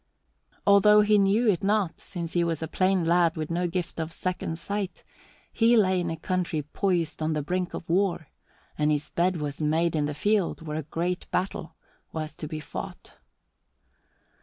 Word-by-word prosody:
Although 210 +1 +7
he 210 0 +4
knew 200 +5 +3
it 195 -2 +2
not, 200 -4 +1
since 170 -3 -6
he 175 - +2
was 165 -2 -1
a - - -2
plain 185 +1 +1
lad 170 0 +3
with 155 +1 -3
no 175 +1 0
gift 175 -1 -3
of 160 0 -3
second 180 -2 -3
sight, 200 +2 -4 0.5
he 230 +1 +4
lay 190 -3 +3
in 175 -1 -1
a 165 - -3
country 170 -2 -1
poised 170 0 -1
on 155 0 0
the 150 -1 -1
brink 180 +3 -2
of 165 - -7
war 175 -3 +1 0.5
and 150 0 +3
his 150 -1 -1
bed 180 +1 +1
was 150 -1 -4
made 160 +2 +1
in 150 -1 +1
the 150 - -4
field 205 -2 0
where 150 0 -3
a 155 -1 -8
great 175 +2 -2
battle 175 -3 -2 0.4
was 155 -1 -5
to 155 - -5
be 155 0 -5
fought. 150 - -8
170 Hz, 185 wpm, -27 LUFS, 160-190 Hz, 0.5 s, Although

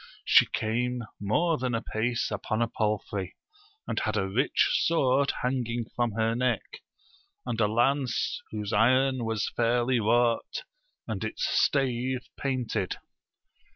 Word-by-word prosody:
She - - +6
came 120 +2 -1 0.2
more 155 +11 +1
than 125 -1 -1
apace 115 +1 -1
upon 110 -1 -2
a - - 0
palfrey, 105 -4 -2 0.5
and - - -1
Jiad 110 -2 -1
a 95 -2 0
rich 120 +9 +2 0.2
sword 140 -4 +3
hanging 120 -2 -1
from 120 -3 0
her 110 +1 +1
neck, 125 -2 -1 0.7
and 115 -2 -2
a 105 - +4
lance, 120 +3 +1
whose 105 0 -4
iron 130 +3 +3
was 110 -1 -1
fairly 120 +1 +2
wrought 120 - +1 0.4
and - - -3
its - - -2
stave 130 -2 +1
painted. 125 -8 -2
120 Hz, 125 wpm, -28 LUFS, 110-130 Hz, 0.7 s, She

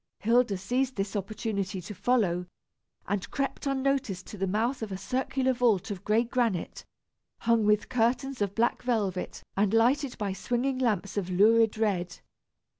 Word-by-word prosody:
Hilda 230 -2 +2
seized 255 +7 -1
this 195 +1 -3
opportunity 200 -1 -3
to 180 +4 -7
follow, 200 -4 +1 0.6
and 200 -1 -2
crept 275 +1 -3
unnoticed 265 -8 0
to 210 - -9
the 195 - 0
mouth 225 +7 0
of 220 -2 -4
a 190 - -3
circular 260 +4 0
vault 230 -6 +1
of 190 -3 -6
gray 215 +2 +3
granite, 235 -7 -1 0.6
hung 230 -2 +3
with 210 0 +3
curtains 250 +1 0
of 200 -1 -1
black 235 +1 +1
velvet 205 -7 -2
and 205 +2 +2
lighted 255 +4 +2
by 200 -2 -2
swinging 245 +7 -1
lamps 210 -6 0
of 190 -3 -1
lurid 220 +4 +4
red. 185 -6 -1
220 Hz, 155 wpm, -28 LUFS, 195-245 Hz, 0.6 s, lurid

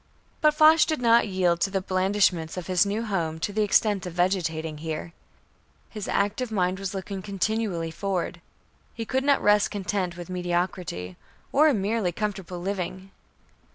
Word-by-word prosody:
But 305 -1 +4
Foch 310 +1 +7
did 310 -4 -1
not 235 -1 +4
yield 180 -3 +1
to - - +2
the 195 0 0
blandishments 185 -3 +1
of 180 - -4
his 185 +2 +2
new 210 +3 -1
home 170 -6 -2
to 205 - -2
the 215 - +1
extent 205 -1 +2
of 175 - -7
vegetating 165 -4 -1
here. 160 +1 -5 0.8
His 210 -3 -6
active 220 +4 0
mind 185 -2 0
was 195 0 -4
looking 195 0 -5
continually 200 -3 -2
forward. 180 -1 -3 0.5
He 230 - -4
could 265 +3 0
not 280 0 +3
rest 210 0 +4
content 185 -3 -2
with 175 - -7
mediocrity, 175 - -3 0.3
or 300 +3 +5
a 290 - +3
merely 205 -1 0
comfortable 190 -2 -4
living. 190 0 -4
190 Hz, 160 wpm, -26 LUFS, 175-210 Hz, 0.8 s, Foch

